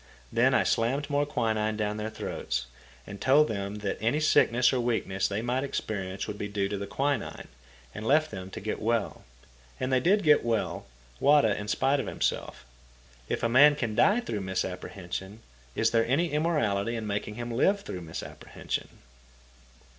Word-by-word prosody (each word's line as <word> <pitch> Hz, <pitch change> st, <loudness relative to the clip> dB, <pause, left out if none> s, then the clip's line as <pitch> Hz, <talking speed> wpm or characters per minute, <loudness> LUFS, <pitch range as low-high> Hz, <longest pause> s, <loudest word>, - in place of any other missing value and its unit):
Then -, -, +3 dB
I -, -, +4 dB
slammed 135 Hz, +6 st, 0 dB
more 145 Hz, 0 st, +1 dB
quinine 110 Hz, -5 st, 0 dB
down 105 Hz, -1 st, -1 dB
their 110 Hz, +1 st, -3 dB
throats, 65 Hz, -, -4 dB, 0.5 s
told 140 Hz, +7 st, +5 dB
them 100 Hz, -1 st, -3 dB
that 100 Hz, -, -2 dB
any 115 Hz, +7 st, +1 dB
sickness 125 Hz, -5 st, +4 dB
or 130 Hz, -, +1 dB
weakness 110 Hz, -5 st, 0 dB
they 100 Hz, +3 st, -3 dB
might 125 Hz, +3 st, 0 dB
experience 95 Hz, -8 st, -3 dB
would 105 Hz, -, -6 dB
be 105 Hz, -, -3 dB
due 100 Hz, -1 st, -1 dB
to 100 Hz, -, -2 dB
the 100 Hz, -, -5 dB
quinine, 140 Hz, +6 st, -2 dB, 0.4 s
and 110 Hz, -, -6 dB
left 155 Hz, +3 st, +3 dB
them 95 Hz, -2 st, -7 dB
to -, -, -7 dB
get 105 Hz, +3 st, -4 dB
well. 115 Hz, -1 st, -1 dB, 0.5 s
And 130 Hz, 0 st, -1 dB
they 130 Hz, -, +5 dB
did 195 Hz, +10 st, +3 dB
get 150 Hz, -2 st, +5 dB
well, 115 Hz, -, -1 dB, 0.3 s
Wada 140 Hz, -8 st, +4 dB
in 105 Hz, -, -6 dB
spite 135 Hz, +6 st, +2 dB
of -, -, -3 dB
himself. -, -, -2 dB, 0.6 s
If -, -, -2 dB
a -, -, +4 dB
man 145 Hz, +5 st, +6 dB
can 120 Hz, -7 st, -2 dB
die 205 Hz, -, +4 dB
through 110 Hz, -, -4 dB
a -, -, -5 dB
misapprehension, 95 Hz, +2 st, -5 dB, 0.3 s
is -, -, +2 dB
there 115 Hz, -1 st, +2 dB
any 165 Hz, +7 st, +1 dB
immorality 120 Hz, -9 st, 0 dB
in 110 Hz, -1 st, -4 dB
making 105 Hz, 0 st, -3 dB
him 120 Hz, +1 st, -5 dB
live 195 Hz, -, +2 dB
through 95 Hz, -, -6 dB
a -, -, -10 dB
misapprehension? 80 Hz, -1 st, -6 dB
115 Hz, 175 wpm, -28 LUFS, 100-140 Hz, 0.6 s, man